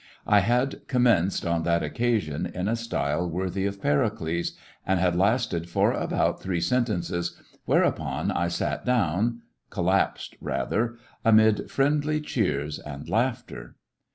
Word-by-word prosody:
I 105 -1 +5
had 125 +7 +1
commenced, 115 -8 +2
on 85 -1 +1
that 85 0 +1
occasion, 100 -2 -1
in 90 +2 -4
a 115 - +1
style 90 -8 -1
worthy 95 +3 -1
of 100 0 -5
Pericles, 80 +1 0 0.3
and 95 -1 +1
had 90 -1 +2
lasted 95 -3 +1
for - - +2
about - - 0
three 90 -3 -1
sentences, 85 -4 -1 0.3
whereupon - - +1
I 85 - 0
sat 85 - -2
down— 115 0 +1 0.3
collapsed - - 0
rather— 115 - -1 0.3
amid 110 -2 +4
friendly 150 +2 +1
cheers 75 - -1
and 75 -1 -8
laughter. 115 - -2
95 Hz, 125 wpm, -26 LUFS, 85-120 Hz, 0.3 s, I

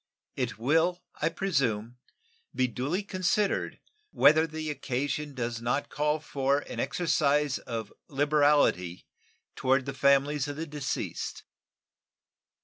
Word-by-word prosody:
It 125 -4 -2
will, 165 +9 +2 0.2
I 160 - +3
presume, 125 - -1 0.6
be 130 - +3
duly 135 - -2
considered 195 +1 0 0.3
whether 160 - +5
the 155 -1 -4
occasion 145 +1 -3
does 120 -2 -3
not 125 +4 -1
call 150 +1 0
for 140 -1 0
an - - -7
exercise 150 -1 +1
of 115 -3 -6
liberality 145 - +2 0.5
toward 130 0 +2
the 140 - -4
families 140 +1 +3
of 145 - -4
the 160 +2 -4
deceased. 145 -3 -4
145 Hz, 115 wpm, -28 LUFS, 130-155 Hz, 0.6 s, whether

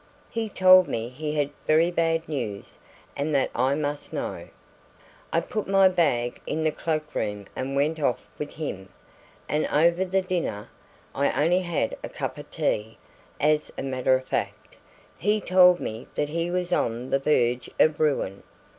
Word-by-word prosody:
He 225 -1 -2
told 185 -2 +6
me 115 0 -3
he 150 +4 -4
had 145 -1 0 0.2
very 160 +3 +4
bad 165 -1 0
news 115 -10 -5 0.4
and 145 +1 -1
that 135 - +1
I 130 +3 +2
must 145 -1 -3
know. - - -4 0.8
"I - - +2
put 215 - -4
my 195 -1 +5
bag 140 -10 0
in 160 - -1
the 155 - +2
cloak 155 -1 -3
room 105 -2 -3
and 135 +1 -3
went 150 +3 +1
off 135 -5 +1 0.2
with 150 - -5
him, 95 -12 -5 0.6
and 150 +1 0
over 170 +4 +3
the 190 +1 0
dinner 175 - -3 0.4
I 140 +1 +1
only 175 +3 +3
had 170 -10 -1
a - - -5
cup - - -5
of - - -10
tea, 110 +1 -2 0.4
as 150 +1 +2
a - - -3
matter 130 -1 +2
of 130 0 -3
fact - - -4 0.4
he 210 +3 +2
told 180 -2 +5
me 110 +2 -6
that 150 - -1
he 170 +2 -1
was 180 0 -1
on 120 -1 -1
the 135 - +3
verge 125 -4 +1
of 155 -1 +4
ruin. 135 -10 0
150 Hz, 170 wpm, -25 LUFS, 130-175 Hz, 0.8 s, told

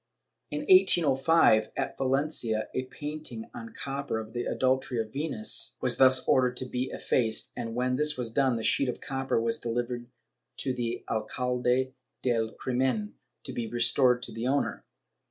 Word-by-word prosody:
In 150 0 -3
1805 165 - +5
at - - -2
Valencia 130 -5 0
a 130 - -2
painting 155 - -7
on 235 -2 -8
copper 140 -3 -3
of 110 0 -7
the 120 0 -3
Adultery 130 -1 0
of 110 -1 -4
Venus 140 -7 +1
was - - 0
thus 130 -1 +5
ordered 125 -1 +3
to 130 - -1
be 125 +1 -3
effaced, 115 -3 0
and 115 -2 -5
when 125 +1 0
this 150 0 +2
was 120 -3 -3
done 135 0 +2
the 115 - -4
sheet 135 +3 +2
of - - -4
copper 135 -3 -1
was 115 0 -1
delivered 120 +1 -3 0.5
to 130 - -1
the 120 -1 -4
alcalde 125 +3 -1 0.3
del 115 -3 +1
crimen, 130 - -1 0.3
to - - -5
be 115 -2 -3
restored 120 +2 +3
to - - -3
the 115 +2 -4
owner. 140 +2 -1
125 Hz, 160 wpm, -28 LUFS, 120-135 Hz, 0.5 s, 1805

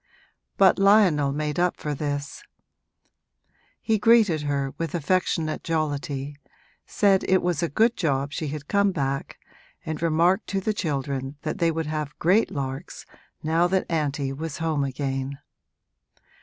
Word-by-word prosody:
But 195 0 +5
Lionel 195 -8 +4
made 150 +2 -2
up 180 0 +1
for 150 - -3
this; 145 -1 -4 1.4
he 220 -2 0
greeted 215 -8 +4
her 140 -2 -2
with 165 -2 -3
affectionate 165 -1 0
jollity, 145 -3 -2 0.5
said 195 -2 +3
it 185 0 +2
was 175 -4 0
a 170 - 0
good 225 - +2
job 140 -4 -1
she 155 +1 -3
had 145 0 -6
come 200 -1 +2
back, 135 -5 -3 0.5
and 160 0 -4
remarked 170 +3 +2
to 195 - -1
the 215 +3 -1
children 140 -6 -3
that 155 - -3
they 170 - +3
would 165 0 -2
have 150 -1 -4
great 190 +7 +3
larks 135 -2 -5 0.4
now 165 +3 +2
that 190 +1 0
auntie 145 -4 -1
was 155 +1 -5
home 160 -3 0
again. 135 0 -3
155 Hz, 140 wpm, -25 LUFS, 140-180 Hz, 1.4 s, But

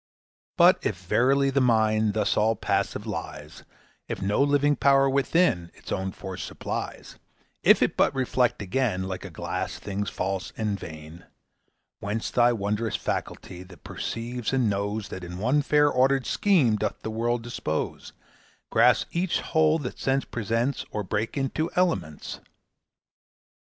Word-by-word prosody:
But - - +6
if - - -1
verily 135 +2 +2
the 140 0 +2
mind 110 -3 +2
Thus 105 -2 +1
all 110 +2 +2
passive 100 -2 -1
lies; - - -7 0.4
If - - -4
no 100 +6 +1
living 145 +1 +3
power 135 -1 +4
within 135 - +2
Its - - -11
own 95 0 -2
force 95 -1 -7
supplies; - - -6 0.4
If - - +6
it - - 0
but - - +4
reflect 125 -4 +1
again, 100 -2 0
Like 95 0 -5
a 95 - -7
glass, 90 +2 -4
things 100 0 -4
false 95 0 -3
and 105 -2 -1
vain 80 +2 -10 0.7
Whence 105 +3 -3
the 120 0 +4
wondrous 105 +2 -1
faculty 90 - -4
That 90 -3 -14
perceives 120 0 -4
and 130 -3 +2
knows, 100 +1 -2
That 95 - -7
in 90 0 -7
one 125 +9 +2
fair 145 +1 +3
ordered 130 +1 +2
scheme 150 - +3
Doth - - -2
the 110 - -3
world 120 +1 -1
dispose; 95 -10 -4 0.6
Grasps - - +4
each 175 +1 0
whole 160 -1 +2
that 135 -6 -6
Sense 135 0 0
presents, 120 +4 -1
Or 105 - -3
breaks 105 +7 -2
into 140 +4 -1
elements? 95 - -1
115 Hz, 145 wpm, -26 LUFS, 100-135 Hz, 0.7 s, But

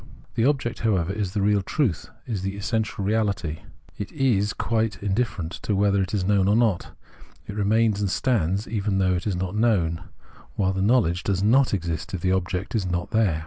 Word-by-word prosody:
The 115 0 +1
object, 130 -5 0
however, 95 -5 +1
is 100 -3 -3
the 105 -2 0
real 105 0 +3
truth, 110 - -1 0.2
is 105 -6 -3
the 95 +1 -3
essential 110 -1 -2
reahty; 100 -7 0 0.4
it 105 - -5
is, 115 -8 +1
quite 110 -1 -1
indifferent 100 -5 -1
to 105 - -1
whether 100 0 +3
it 95 - -2
is 100 -4 0
known 100 -1 +3
or 105 - +4
not; 110 -6 +1 0.5
it 100 - -7
remains 105 0 +2
and 100 - 0
stands 100 -3 0
even 105 -3 -1
though 95 -1 +2
it 90 +3 -2
is 100 - 0
not 90 +2 -3
known, 90 -8 +1 0.5
while 95 -1 +1
the 95 - -2
knowledge 95 -6 +3
does 95 -1 -1
not 130 +5 +4
exist 85 -1 -3
if 90 - -5
the 95 - +1
object 95 +3 -1
is 105 -5 0
not 90 0 -2
there. 105 -8 +2
100 Hz, 195 wpm, -24 LUFS, 95-110 Hz, 0.5 s, or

